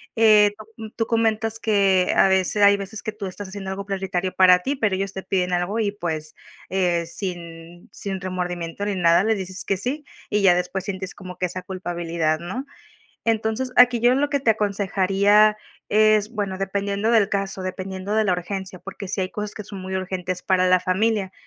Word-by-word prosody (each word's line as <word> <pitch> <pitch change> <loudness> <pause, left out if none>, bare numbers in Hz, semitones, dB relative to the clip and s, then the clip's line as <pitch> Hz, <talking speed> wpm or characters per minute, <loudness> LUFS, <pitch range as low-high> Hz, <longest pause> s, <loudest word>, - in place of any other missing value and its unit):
Eh, 215 -2 +6 0.3
no, 220 -1 -7
tú 225 - 0
comentas 225 -1 0
que, 195 -4 +2
a 195 - +5
veces 190 +2 +2
hay 200 0 +6
veces 200 +2 -6
que 215 - -3
tú 210 -1 -7
estás 190 +1 -7
haciendo 190 0 -6
algo 195 +1 -5
prioritario 190 -2 -2
para 180 -1 +6
ti, 275 +9 -3
pero 210 -6 +1
ellos 195 +1 -2
te 190 - -6
piden 180 -2 -1
algo 180 +5 -1
y, 210 -2 +1
pues, 160 -6 -4 0.4
eh, 175 -3 +1
sin 170 -2 -7
sin 195 -2 -5
remordimiento 180 0 -4
ni 205 -1 -1
nada, 170 +1 +4
les 220 -1 +2
dices 190 -1 -5
que 195 - +1
sí, 265 +10 -3 0.2
y 210 0 +1
ya 185 -3 +6
después 180 +2 -2
sientes 190 -1 -4
como 185 -2 -10
que 180 - 0
esa 185 +1 -5
culpabilidad, 170 -4 -2
¿no? 245 +11 -5 0.6
Entonces, 225 +3 0
aquí 245 -1 +6
yo 240 +2 +4
en 265 - +1
lo 290 0 0
que 285 - +1
te 260 -4 +2
aconsejaría, 205 0 +3 0.3
es, 215 0 +3
bueno, 200 -4 -3
dependiendo 200 +2 -1
del 220 -4 +4
caso, 195 -1 -2
dependiendo 190 +2 -4
de 220 - +3
la 205 - +1
urgencia, 185 +1 -4
porque 195 +1 -8
sí 195 - -2
hay 185 - -3
cosas 210 0 -5
que 215 - -7
son 200 -1 -8
muy 190 0 -4
urgentes 185 -1 -3
para 185 -2 +2
la 185 0 +5
familia 190 +2 0
195 Hz, 200 wpm, -23 LUFS, 185-210 Hz, 0.6 s, Eh